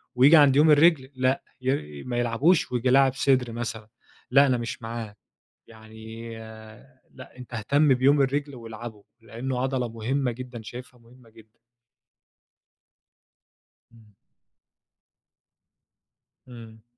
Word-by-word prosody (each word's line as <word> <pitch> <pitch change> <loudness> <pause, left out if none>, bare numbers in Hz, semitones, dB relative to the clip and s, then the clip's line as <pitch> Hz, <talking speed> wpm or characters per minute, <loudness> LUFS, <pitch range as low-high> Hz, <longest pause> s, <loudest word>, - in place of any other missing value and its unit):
وييجي 140 +6 +6
عند 140 -3 +5
يوم 150 +2 +5
الرِجل 150 -3 +4
لأ، 130 +1 0 0.2
ي 75 - -3
ما 120 -1 -4
يلعبوش 120 +8 +1
وييجي 125 +1 0
لاعب 135 0 +4
صدر 130 -3 +1
مثلًا 115 -2 -6 0.4
لأ، 140 +2 +6
أنا 125 - +1
مش 120 +1 -6
معاه. 115 -2 -7 0.5
يعني 110 +1 -11 0.8
لأ، - - -14
أنتَ 125 -1 -11
اهتم 140 +6 +2
بيوم 140 +3 +3
الرِجل 140 +1 -2
والعبه، 115 -3 -10 0.2
لإنه 125 +3 -5
عضلة 130 -2 -1
مهمة 125 +4 -2
جدًا، 120 -1 -9
شايفها 125 +2 -11
مهمة 120 0 -20
جدًا. 110 0 -20 2.3
امم. 110 -3 -22 2.3
امم. 115 -3 -13
125 Hz, 115 wpm, -25 LUFS, 115-135 Hz, 2.3 s, وييجي